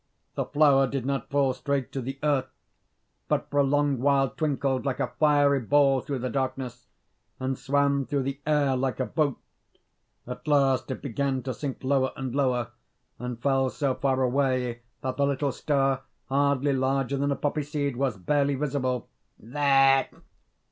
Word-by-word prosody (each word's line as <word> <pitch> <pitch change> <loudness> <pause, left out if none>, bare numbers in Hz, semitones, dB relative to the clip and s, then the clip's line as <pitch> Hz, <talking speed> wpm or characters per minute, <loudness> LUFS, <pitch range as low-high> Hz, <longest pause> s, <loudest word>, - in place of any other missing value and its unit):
The - - -2
flower 145 -2 +4
did 130 -1 -3
not 135 0 -2
fall 140 -2 +2
straight 140 0 -2
to 135 - -3
the 135 +2 -5
earth, 140 -3 +1 0.8
but - - -1
for 145 - +1
a - - +5
long 145 -1 +1
while 135 0 +3
twinkled 135 -3 -1
like 135 -2 -2
a - - -2
fiery 145 -2 +4
ball 135 +1 +3
through 140 +1 -4
the 130 0 -3
darkness, 130 -2 -3 0.5
and 130 +1 -1
swam 140 0 +1
through 140 -2 0
the 135 +1 -4
air 145 -3 +2
like 130 0 -1
a 130 - +1
boat. 150 -3 0 0.9
At 125 +5 -8
last 135 -3 +2
it 130 - -5
began 135 0 -1
to 130 0 -3
sink 135 -1 -5
lower 130 -1 +1
and 130 -2 -4
lower, 125 -4 0 0.5
and 125 -1 -5
fell 135 0 +2
so 135 0 -1
far 130 0 0
away 125 -2 0 0.2
that 130 -1 -3
the 140 0 +2
little 140 0 0
star, 135 -1 0 0.3
hardly 140 0 +2
larger 135 +1 0
than 140 +1 0
a - - +1
poppy 150 +2 -1
seed, 145 -2 -2
was 130 -4 -1
barely 140 +8 +1
visible. 130 -3 -2 0.3
"There!" 135 +2 +3
135 Hz, 170 wpm, -26 LUFS, 130-140 Hz, 0.9 s, a